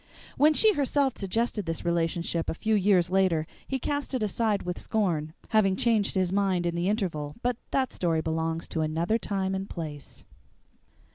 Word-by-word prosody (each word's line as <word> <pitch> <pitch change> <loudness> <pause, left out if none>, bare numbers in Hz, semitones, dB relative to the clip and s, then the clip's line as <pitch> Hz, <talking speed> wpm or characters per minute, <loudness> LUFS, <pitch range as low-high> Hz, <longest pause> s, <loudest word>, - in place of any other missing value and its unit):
When 305 +2 +4
she 435 +5 +5
herself 280 -3 +1
suggested 210 0 -1
this 165 0 -3
relationship 170 0 0
a - - -1
few 220 +5 0
years 185 -3 +3
later 185 -5 +2 0.2
he 265 - -1
cast 285 +1 -2
it 245 - -1
aside 210 0 0
with 180 0 -4
scorn, 165 -8 -1 0.2
having 210 -4 +3
changed 220 -2 +1
his 185 -1 +1
mind 195 -3 +1
in 170 - 0
the 170 +2 0
interval 165 -9 -2
but 245 -1 0
that 265 -2 0
story 165 -3 0
belongs 160 +1 -2
to 160 - -2
another 165 +8 0
time 195 -3 -2
and 190 +1 -3
place. 150 -4 -7
190 Hz, 170 wpm, -27 LUFS, 165-220 Hz, 0.2 s, she